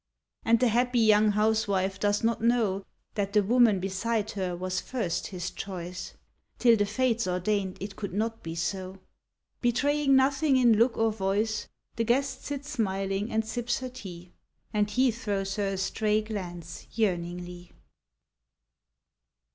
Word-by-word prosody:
And 230 Hz, 0 st, +4 dB
the 250 Hz, -1 st, +3 dB
happy 245 Hz, +2 st, +1 dB
young 215 Hz, -2 st, +5 dB
housewife 200 Hz, -3 st, +1 dB
does 205 Hz, +1 st, +1 dB
not 230 Hz, 0 st, +1 dB
know 225 Hz, -5 st, +2 dB, 0.3 s
That 200 Hz, -1 st, -2 dB
the 210 Hz, -1 st, +4 dB
woman 230 Hz, -2 st, +4 dB
beside 210 Hz, +3 st, -1 dB
her 185 Hz, -3 st, -2 dB
was 185 Hz, +1 st, -2 dB
first 220 Hz, -10 st, -2 dB
his 180 Hz, -1 st, -5 dB
choice, 180 Hz, -2 st, -6 dB, 0.4 s
Till 235 Hz, -2 st, +5 dB
the 205 Hz, -2 st, +1 dB
fates 230 Hz, 0 st, +1 dB
ordained 185 Hz, +1 st, -1 dB
it 195 Hz, +1 st, -6 dB
could 200 Hz, -1 st, -5 dB
not 225 Hz, +4 st, -2 dB
be 165 Hz, 0 st, -6 dB
so... 185 Hz, +2 st, -3 dB, 0.6 s
Betraying 275 Hz, +3 st, +2 dB
nothing 270 Hz, +1 st, +3 dB
in 240 Hz, -3 st, +5 dB
look 235 Hz, +1 st, +3 dB
or 225 Hz, 0 st, +2 dB
voice 210 Hz, +1 st, -1 dB, 0.3 s
The 230 Hz, -, +1 dB
guest 255 Hz, +5 st, 0 dB
sits 285 Hz, 0 st, -5 dB
smiling 195 Hz, 0 st, -1 dB
and 220 Hz, 0 st, 0 dB
sips 240 Hz, +2 st, -2 dB
her 255 Hz, -, -4 dB
tea, 180 Hz, -7 st, -10 dB, 0.4 s
And 210 Hz, -1 st, +1 dB
he 255 Hz, +4 st, +3 dB
throws 200 Hz, -4 st, -3 dB
her 205 Hz, -1 st, 0 dB
a 195 Hz, 0 st, -2 dB
stray 215 Hz, +2 st, 0 dB
glance 175 Hz, -6 st, -7 dB
yearningly. 175 Hz, -4 st, -2 dB
210 Hz, 145 wpm, -28 LUFS, 190-230 Hz, 0.6 s, young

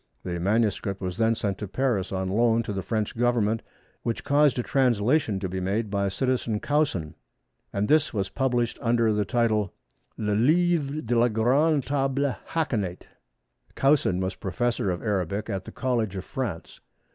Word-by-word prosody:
The 85 Hz, -1 st, -3 dB
manuscript 100 Hz, 0 st, 0 dB
was 90 Hz, -1 st, -4 dB
then 115 Hz, 0 st, +3 dB
sent 100 Hz, -3 st, -2 dB
to 105 Hz, -, -4 dB
Paris 110 Hz, -3 st, -1 dB
on 95 Hz, -1 st, -2 dB
loan 115 Hz, +3 st, +2 dB
to 105 Hz, -, -4 dB
the 95 Hz, -, -2 dB
French 110 Hz, +1 st, -2 dB
Government 115 Hz, -2 st, +1 dB, 0.4 s
which 115 Hz, -, -3 dB
caused 145 Hz, -2 st, +3 dB
a 125 Hz, -, 0 dB
translation 120 Hz, -3 st, +2 dB
to 95 Hz, -, -2 dB
be 95 Hz, +1 st, -4 dB
made 100 Hz, +3 st, -1 dB
by 100 Hz, -1 st, 0 dB
"Citizen" 120 Hz, +1 st, -1 dB
Caussin, 135 Hz, -, 0 dB, 0.6 s
and 100 Hz, +1 st, -1 dB
this 155 Hz, 0 st, +3 dB
was 100 Hz, -3 st, -1 dB
published 120 Hz, -1 st, -1 dB
under 115 Hz, -2 st, +2 dB
the 105 Hz, -1 st, 0 dB
title 110 Hz, +1 st, +1 dB
of 95 Hz, -, -14 dB, 0.5 s
Le 105 Hz, -1 st, -1 dB
Livre 155 Hz, +4 st, +2 dB
de 120 Hz, +1 st, 0 dB
la 120 Hz, +1 st, +5 dB
grande 135 Hz, +7 st, +2 dB
Table 135 Hz, 0 st, 0 dB
Hakénate. 110 Hz, -, -1 dB, 0.7 s
Caussin 135 Hz, -10 st, +3 dB
was 95 Hz, 0 st, -1 dB
Professor 115 Hz, +2 st, -1 dB
of 90 Hz, -1 st, -3 dB
Arabic 100 Hz, 0 st, -1 dB
at 95 Hz, -1 st, -3 dB
the -, -, -8 dB
College 115 Hz, -6 st, -1 dB
of 95 Hz, -, -5 dB
France. 110 Hz, -11 st, -5 dB
115 Hz, 170 wpm, -26 LUFS, 100-130 Hz, 0.7 s, la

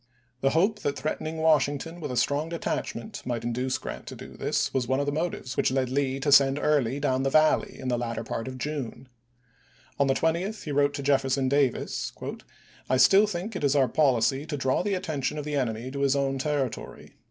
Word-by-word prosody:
The 135 Hz, -, +2 dB
hope 210 Hz, +5 st, +2 dB
that 145 Hz, -5 st, -2 dB
threatening 155 Hz, +1 st, -3 dB
Washington 160 Hz, +1 st, +1 dB
with 150 Hz, -, -4 dB
a 125 Hz, -, -3 dB
strong 145 Hz, +5 st, +1 dB
detachment 215 Hz, +4 st, -4 dB
might 120 Hz, -2 st, -3 dB
induce 125 Hz, +2 st, -1 dB
Grant -, -, -7 dB
to -, -, -7 dB
do -, -, -10 dB
this -, -, -1 dB
was 130 Hz, -3 st, 0 dB
one 130 Hz, +2 st, +1 dB
of 140 Hz, -, 0 dB
the 145 Hz, -, 0 dB
motives 155 Hz, -4 st, -3 dB
which -, -, +2 dB
led 130 Hz, -1 st, 0 dB
Lee 135 Hz, 0 st, 0 dB
to 145 Hz, +1 st, +1 dB
send 140 Hz, 0 st, +6 dB
Early 145 Hz, -3 st, +1 dB
down 130 Hz, -2 st, +1 dB
the 135 Hz, -, +1 dB
Valley 155 Hz, +2 st, +3 dB
in 130 Hz, -, -5 dB
the 120 Hz, -1 st, 0 dB
latter 115 Hz, -1 st, -3 dB
part 115 Hz, +1 st, -4 dB
of 130 Hz, 0 st, -6 dB
June. 135 Hz, -2 st, -5 dB
we*. 120 Hz, -, -34 dB
On 140 Hz, -, +3 dB
the 135 Hz, -, +2 dB
20th 175 Hz, +8 st, -1 dB
he 150 Hz, -, -5 dB
wrote 145 Hz, 0 st, +2 dB
to 140 Hz, -, -4 dB
Jefferson 135 Hz, -1 st, +2 dB
Davis, 140 Hz, -2 st, 0 dB, 0.4 s
" -, -, -27 dB
I 130 Hz, -, +3 dB
still 195 Hz, +10 st, +6 dB
think 200 Hz, +2 st, -4 dB
it 185 Hz, -, -4 dB
is 140 Hz, 0 st, +3 dB
our 135 Hz, -2 st, +4 dB
policy 135 Hz, -1 st, +2 dB
to 150 Hz, -2 st, -3 dB
draw 130 Hz, -1 st, +1 dB
the 200 Hz, +1 st, 0 dB
attention 155 Hz, -6 st, -2 dB
of 150 Hz, -, -4 dB
the 150 Hz, -, -4 dB
enemy 125 Hz, -2 st, -2 dB
to 140 Hz, -, -5 dB
his 140 Hz, 0 st, +2 dB
own 135 Hz, -1 st, 0 dB
territory. 140 Hz, -3 st, -3 dB
140 Hz, 220 wpm, -27 LUFS, 130-155 Hz, 0.4 s, send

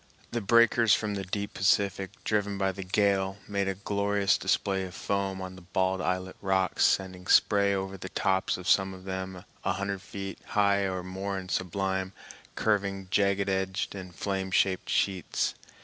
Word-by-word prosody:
The 120 Hz, -, -1 dB
breakers 115 Hz, +1 st, +5 dB
from 105 Hz, -1 st, -2 dB
the 100 Hz, -1 st, -3 dB
deep 100 Hz, +2 st, -4 dB
Pacific, 95 Hz, -1 st, +2 dB
driven 105 Hz, -2 st, 0 dB
by 95 Hz, -1 st, +1 dB
the 95 Hz, +1 st, -7 dB
gale, 95 Hz, 0 st, +1 dB
made 100 Hz, -1 st, -1 dB
a 95 Hz, -, -1 dB
glorious 100 Hz, 0 st, +1 dB
display 95 Hz, -1 st, 0 dB
of 90 Hz, -1 st, -7 dB
foam 95 Hz, -1 st, -2 dB
on 95 Hz, 0 st, -7 dB
the 95 Hz, -, -12 dB
bald 95 Hz, +1 st, 0 dB
islet 90 Hz, 0 st, -2 dB
rocks, 95 Hz, -1 st, +1 dB
sending 95 Hz, -1 st, 0 dB
spray 100 Hz, -1 st, +4 dB
over 95 Hz, 0 st, -3 dB
the 95 Hz, 0 st, -7 dB
tops 95 Hz, 0 st, +1 dB
of 90 Hz, -, -8 dB
some 95 Hz, -1 st, +3 dB
of 95 Hz, -, -13 dB
them 95 Hz, -1 st, -5 dB, 0.2 s
a -, -, +1 dB
hundred 100 Hz, 0 st, -3 dB
feet 95 Hz, 0 st, -7 dB, 0.2 s
high 100 Hz, -1 st, +4 dB
or 95 Hz, -1 st, -3 dB
more 95 Hz, +2 st, -4 dB
in 95 Hz, -1 st, -6 dB
sublime, 95 Hz, +1 st, -1 dB, 0.4 s
curving, 100 Hz, -3 st, 0 dB
jagged 100 Hz, 0 st, +2 dB
edged 95 Hz, 0 st, -1 dB
and 95 Hz, -3 st, -8 dB
flame 95 Hz, -1 st, -2 dB
shaped 95 Hz, 0 st, +1 dB
sheets. 95 Hz, -3 st, 0 dB
95 Hz, 170 wpm, -29 LUFS, 95-100 Hz, 0.4 s, breakers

